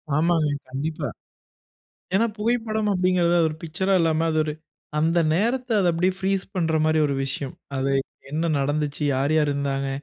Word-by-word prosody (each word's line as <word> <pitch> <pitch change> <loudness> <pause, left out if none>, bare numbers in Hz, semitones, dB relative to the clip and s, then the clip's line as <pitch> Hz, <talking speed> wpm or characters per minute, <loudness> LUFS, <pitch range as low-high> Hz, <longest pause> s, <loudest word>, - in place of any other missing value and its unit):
ஆமாங்க 160 0 +2 0.2
கண்டிப்பா. 150 +4 -3 1.1
ஏன்னா, 220 +4 +4
புகைப்படம் 220 -1 0
அப்படிங்கிறது 180 -2 +2
அது 165 -1 +4
ஒரு 155 - -7
பிக்சர்‌ரா 190 +4 0
இல்லாம, 160 -1 +2
அது 155 - 0
ஒரு 155 - -2 0.5
அந்த 165 +3 +2 0.2
நேரத்தில 235 +5 +1
அத 180 - +3
அப்படியே 180 +3 +1
ப்ரீஸ் 195 0 0
பண்ணுற 165 -3 +1
மாரி 155 0 +3
ஒரு 140 - -1
விஷயம். 135 0 -4 0.2
அது 135 +1 0 0.4
என்ன 160 +3 0
நடந்துச்சு? 145 +1 -1
யார் 135 +3 +1
யார் 150 -2 +3
இருந்தாங்க? 140 -1 -1
160 Hz, 155 wpm, -24 LUFS, 150-190 Hz, 1.1 s, ஏன்னா